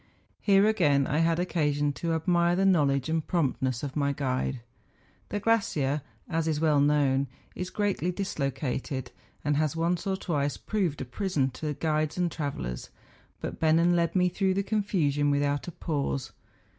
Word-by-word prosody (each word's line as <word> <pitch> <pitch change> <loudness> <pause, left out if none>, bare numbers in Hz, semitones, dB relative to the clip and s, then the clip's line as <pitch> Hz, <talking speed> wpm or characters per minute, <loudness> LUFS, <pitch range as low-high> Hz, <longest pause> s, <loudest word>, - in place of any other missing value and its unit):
Here 200 -1 +4
again 150 -11 +3
I 150 +4 0
had 165 0 +3
occasion 150 -5 0
to 165 +3 -2
admire 170 +1 +2
the 190 +2 +2
knowledge 140 -8 +3
and 160 0 0
promptness 130 -6 0
of 140 -2 -4
my 140 -1 +1
guide. 130 -2 -2 0.7
The 205 - -2
glacier, 155 -11 +1 0.3
as 165 0 -1
is 155 -2 0
well 155 -2 +3
known, 140 -2 +3 0.3
is 180 0 -4
greatly 200 -4 -1
dislocated, 140 -7 -3 0.3
and 145 -1 +2
has 155 -1 +1
once 170 +3 0
or 190 -1 0
twice 145 -6 -1
proved 185 -10 -1
a - - -3
prison 140 - -1
to 150 +4 -4
guides 155 0 -1
and 175 -2 +1
travellers; 100 - -4 0.5
but - - -5
Bennen 165 +2 +4
led 170 +1 +1
me 180 -1 +4
through 190 +1 0
the 200 - +1
confusion 180 -9 +1
without 145 +1 0
a - - -4
pause. 140 -4 -2
155 Hz, 160 wpm, -28 LUFS, 140-180 Hz, 0.7 s, Here